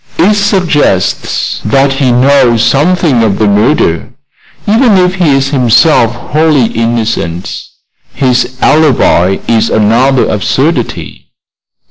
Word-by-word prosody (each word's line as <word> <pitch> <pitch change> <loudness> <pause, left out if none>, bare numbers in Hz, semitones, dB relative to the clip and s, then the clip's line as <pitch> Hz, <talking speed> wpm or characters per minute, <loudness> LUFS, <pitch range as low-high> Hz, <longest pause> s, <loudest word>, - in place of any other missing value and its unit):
"It 190 +6 +2
suggests 180 - -1
that 135 0 +1
he 135 -2 0
knows 125 -2 +2
something 150 -3 +1
of 105 -3 0
the 110 - 0
murder, 105 - 0 0.6
even 220 0 +2
if 180 0 +1
he 170 -7 +1
is 135 0 -1
himself 125 -1 +2
wholly 150 +1 0
innocent. 110 -6 -3 0.5
His 130 -1 -1
alibi 125 - +2
is 115 -1 0
another 120 +5 +1
absurdity." 105 -2 -3
130 Hz, 105 wpm, -9 LUFS, 115-155 Hz, 0.6 s, It